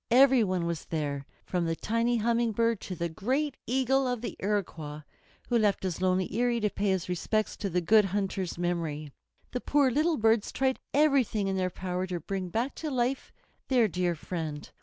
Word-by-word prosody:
Every 260 0 +6
one 185 -4 0
was 170 -3 -3
there, 145 -3 -3 0.2
from 180 -2 -1
the 165 - 0
tiny 230 +5 0
Humming 230 0 +1
Bird 230 0 +1
to 185 - -5
the 170 0 -1
great 260 - -1
Eagle 265 +1 +2
of 245 -2 -2
the 240 - -4
Iroquois, 170 -7 -2 0.5
who 240 -1 +2
left 205 -3 +2
his 185 -2 -2
lonely 185 0 +2
eyrie 240 0 +2
to 210 -1 +1
pay 205 0 -1
his 190 -2 0
respects 215 +4 -1
to 200 - -2
the 180 0 0
Good 210 +4 +5
Hunter's 195 -2 -2
memory. 165 -4 -2 0.4
The 250 - -3
poor 280 -3 +3
little 310 +5 +2
birds 220 -1 +2
tried 265 0 0
everything 270 -8 +3
in 195 - 0
their 185 -1 0
power 185 0 -3
to 180 -1 -3
bring 190 0 -4
back 235 +8 -1
to 315 - -3
life 255 0 -1 0.4
their 245 -4 +4
dear 180 -1 0
friend. 155 -2 -5
205 Hz, 190 wpm, -29 LUFS, 180-245 Hz, 0.5 s, Every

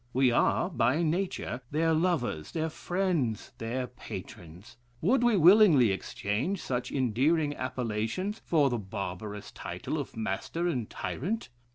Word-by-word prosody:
We 130 -1 +4
are, 120 - +2
by 145 +2 +2
nature, 165 -6 -1
their 160 +2 +2
lovers, 155 - 0
their 160 0 -1
friends, 175 - -1
their 120 +3 -2
patrons. 105 -2 -10 0.2
Would 240 - +3
we 240 -4 +4
willingly 170 - +7
exchange 105 - -2
such 125 -5 -3
endearing 145 +5 +1
appellations 130 - -2
for 145 -5 +3
the 120 - -1
barbarous 100 +1 -6
title - - -4
of - - -6
master 110 - -2
and 125 -10 -2
tyrant? 210 - -3
130 Hz, 130 wpm, -29 LUFS, 110-170 Hz, 0.2 s, willingly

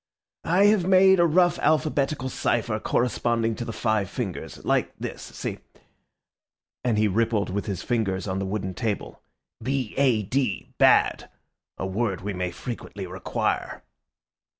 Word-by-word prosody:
I 185 +4 +5
have 205 -4 +4
made 190 0 +6
a 170 - +5
rough 175 +2 +3
alphabetical 150 -3 +1
cypher 115 -3 0
corresponding 115 -1 0
to 120 - -4
the 115 - -4
five 110 -3 0
fingers—like 100 -7 -2
this, - - -6
see," - - -6 1.2
and 120 -4 +1
he 105 0 +3
rippled 105 0 +1
with 100 +3 -3
his 95 -4 -3
fingers 105 -6 -1
on 95 0 -2
the 95 - -2
wooden 95 -1 -3
table—"B 125 +3 -4
A 125 -6 +3
D, 125 -1 -2
bad, - - +4 0.5
a - - -3
word 95 0 -1
we 100 +1 -3
may 90 -1 -2
frequently 105 0 -7
require." 90 +1 -2
115 Hz, 135 wpm, -25 LUFS, 100-135 Hz, 1.2 s, made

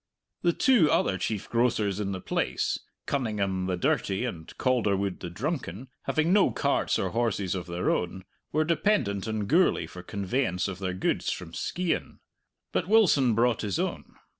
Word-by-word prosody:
The 175 - +3
two 240 - +4
other 95 -1 +2
chief 105 +2 -2
grocers 110 -4 +1
in 100 -2 -2
the 95 - -3
place, - - -1 0.3
Cunningham 100 -8 -1
the 90 -1 -1
dirty 95 +5 0
and 80 -10 -6
Calderwood 100 -7 +1
the 90 - -5
drunken, 125 - -4 0.2
having 155 +3 +2
no 205 -1 +5
carts - - +1
or - - -1
horses 110 -5 0
of 90 -2 -4
their 85 +1 0
own, 90 +2 -2 0.3
were 155 +1 +2
dependent 135 - +1
on 110 -2 -1
Gourlay 170 - +3
for 90 - -10
conveyance 100 +1 -1
of 95 -2 -5
their 95 -2 -2
goods 95 - 0
from 85 -2 -6
Skeighan. 180 - -2 0.5
But - - -1
Wilson 165 - +4
brought 120 0 +2
his 100 -3 -1
own. - - -3
105 Hz, 165 wpm, -28 LUFS, 95-135 Hz, 0.5 s, no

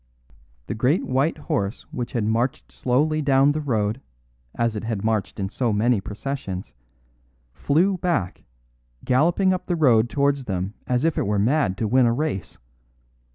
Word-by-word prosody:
"The - - -4
great 130 +10 +1
white 135 +6 +1
horse 100 -7 -3
which 120 -1 -5
had 115 - 0
marched 115 +4 -1
slowly 150 +5 +1
down 140 0 +4
the 155 +1 -2
road, 110 -3 -1 0.5
as 115 -1 0
it 105 - -4
had 110 -3 -3
marched 110 -2 -1
in 95 - -1
so 120 +2 -1
many 105 +1 +2
processions, 105 -3 -5 0.8
flew 175 - +1
back, 165 - -1 0.6
galloping 170 +9 +3
up 185 - -4
the 175 - 0
road 120 -8 +4
towards 140 -1 +1
them 95 -1 -3
as 125 +4 +1
if 165 - +1
it - - -1
were 105 0 +1
mad 110 -2 +1
to 110 - -1
win 125 +2 +4
a 115 - +2
race. 130 - -3
125 Hz, 160 wpm, -23 LUFS, 105-145 Hz, 0.8 s, down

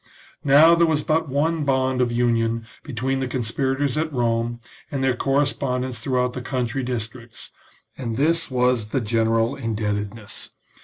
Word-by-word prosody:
Now 150 +4 +7
there 170 0 +4
was 150 -2 +1
but 160 -1 +1
one 155 +4 +1
bond 130 -2 +1
of 120 -1 +1
union 115 -1 +1 0.2
between 135 -1 -2
the 130 - -1
conspirators 135 +4 -1
at 160 0 -1
Rome 120 -2 0 0.3
and 135 -2 -2
their 130 -1 +2
correspondents 130 -2 0
throughout 125 -2 0
the 125 - -5
country 125 0 -2
dis 120 -4 -2
tricts, 115 0 -11 0.4
and 115 -4 -4
this 165 +4 +2
was 125 -3 +1
the 130 +4 -1
general 115 +2 +1
indebtedness. 105 -3 -4
125 Hz, 150 wpm, -23 LUFS, 115-140 Hz, 0.4 s, Now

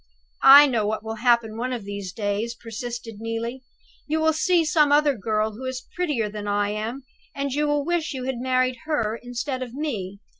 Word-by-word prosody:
"I 280 +2 +10
know 235 -7 0
what 215 0 -2
will 225 0 -5
happen 235 -3 +3
one 250 +2 -2
of 240 -5 -4
these 200 -2 -5
days," 205 +4 -2
persisted 230 0 -7
Neelie. 230 +3 -4 0.5
"You 310 +2 0
will 315 0 +3
see 335 +2 +2
some 300 -2 +3
other 295 0 +4
girl 215 0 -1
who 235 +5 -9
is 260 0 -4
prettier 295 -12 -1
than 205 0 -6
I 205 0 +1
am; 225 +6 -4 0.3
and 280 0 -2
you 295 +3 0
will 290 -1 0
wish 345 -2 -1
you 260 -2 -5
had 260 -2 -3
married 255 0 +1
her 230 -8 -1
instead 245 +2 -4
of 250 -1 -6
me!" 205 -10 -4
245 Hz, 195 wpm, -24 LUFS, 220-285 Hz, 0.5 s, I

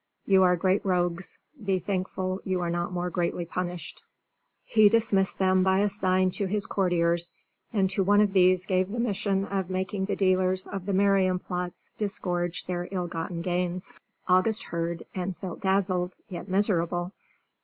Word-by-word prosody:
"You 195 -1 +5
are 180 -1 +5
great 185 +3 +1
rogues. 175 -1 0 0.3
Be 195 -1 +1
thankful 185 0 -2
you 185 -1 -1
are 170 -1 -1
not 175 +1 -2
more 180 0 -2
greatly 175 0 -1
punished." 175 0 -5 0.6
He 215 -2 +5
dismissed 205 -4 +2
them 185 -1 +3
by 190 +1 +3
a 205 - +2
sign 185 -2 +1
to 200 +2 -1
his 205 +1 -1
courtiers, 175 -2 +1 0.4
and 195 -4 +2
to 195 - 0
one 205 +2 +4
of 205 -2 +3
these 185 -1 +4
gave 185 0 +1
the 235 +4 -4
mission 200 -4 0
of 195 -2 -2
making 190 +1 -2
the 200 - -1
dealers 185 -1 +2
of 195 -1 -6
the 200 - 0
Marienplatz 185 -2 0
disgorge 180 -4 -2
their 175 -1 -3
ill 185 -2 -2
gotten 170 0 -4
gains. 180 0 -2 0.3
August 185 +4 +3
heard, 170 0 -3
and 185 -1 -3
felt 185 -3 -7
dazzled 190 -2 0
yet 185 +1 -7
miserable. 180 -3 0
185 Hz, 165 wpm, -27 LUFS, 180-195 Hz, 0.6 s, You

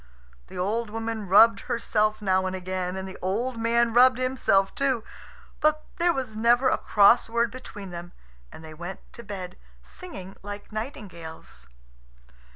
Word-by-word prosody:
The - - -10
old 210 +5 -1
woman 225 -1 -4
rubbed 225 +5 +7
herself 215 -2 0
now 185 -1 +2
and 185 - -3
again. 185 0 -3
And 190 0 -5
the 190 - -10
old 230 +6 -2
man 230 0 +2
rubbed 250 +1 +6
himself 255 -7 +1
too. 265 -5 0 0.6
But 305 0 +2
there 345 0 +3
was 260 -8 -4
never 240 +4 +4
a - - +2
cross 210 +3 +5
word 235 0 +1
between 205 -6 -9
them, 175 0 -8 0.4
and 160 - -11
they 155 - -10
went 175 +4 -7
to - - -9
bed 190 -4 -7 0.3
singing 195 - -10
like 205 +1 -8
nightingales. 185 - -8
215 Hz, 155 wpm, -26 LUFS, 190-235 Hz, 0.6 s, rubbed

